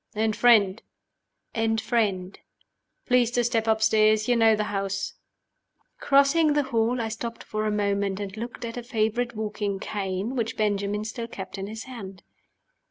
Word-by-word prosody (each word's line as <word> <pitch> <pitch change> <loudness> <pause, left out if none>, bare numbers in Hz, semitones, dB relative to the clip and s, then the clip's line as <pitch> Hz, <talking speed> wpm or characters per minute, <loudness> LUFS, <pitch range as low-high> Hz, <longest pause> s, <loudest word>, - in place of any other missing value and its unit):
"And 220 0 +1
friend?" 220 -4 +4 0.7
"And 225 -1 +1
friend." 205 -5 -1 0.7
"Please 245 -2 +3
to 245 0 +1
step 230 -1 0
upstairs. 215 -1 +3
You 245 - +3
know 225 -1 +5
the 210 - -1
house." 195 0 -2 0.9
Crossing 280 +3 +4
the 295 0 +2
hall, 240 -1 0
I 225 - -1
stopped 230 +1 -5
for 215 0 -2
a - - 0
moment, 200 -1 0
and 200 -1 -5
looked 235 +2 -6
at 230 +1 -6
a - - -3
favorite 235 0 -1
walking 210 -2 -3
cane 195 +4 -3
which 230 -3 -2
Benjamin 205 0 0
still 230 +1 -5
kept 195 -3 -7
in 195 - -4
his 220 +1 -7
hand. 200 -8 -9
220 Hz, 160 wpm, -26 LUFS, 205-235 Hz, 0.9 s, know